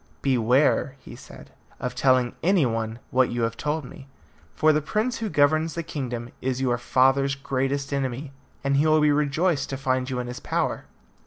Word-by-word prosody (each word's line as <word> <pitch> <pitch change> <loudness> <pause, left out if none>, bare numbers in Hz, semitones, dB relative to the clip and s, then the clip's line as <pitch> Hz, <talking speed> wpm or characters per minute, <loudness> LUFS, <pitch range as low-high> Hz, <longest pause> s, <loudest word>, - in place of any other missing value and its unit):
"Beware," 130 +2 +2
he 135 - -12
said, - - -13 0.3
"of - - -3
telling 130 -2 +2
any 180 -3 +3
one 115 -1 -2
what 130 0 +3
you 120 -1 -2
have 115 0 -1
told 150 +3 -2
me, 135 +2 -12 0.5
for 155 0 +4
the 150 - +1
prince 215 - -1
who 225 -2 -2
governs 155 +1 +2
the 170 - -3
kingdom 125 -6 -5
is 130 0 -1
your 125 -2 0
father's 135 +2 +2
greatest 135 +1 -2
enemy, 135 +1 -3 0.3
and 140 0 +1
he 150 +3 +3
will 155 0 +4
be 150 0 +4
rejoiced 150 +3 +1
to 135 - -3
find 130 -1 -1
you 130 - -3
in 125 - -2
his 125 0 -6
power." - - -2
135 Hz, 185 wpm, -25 LUFS, 125-150 Hz, 0.5 s, for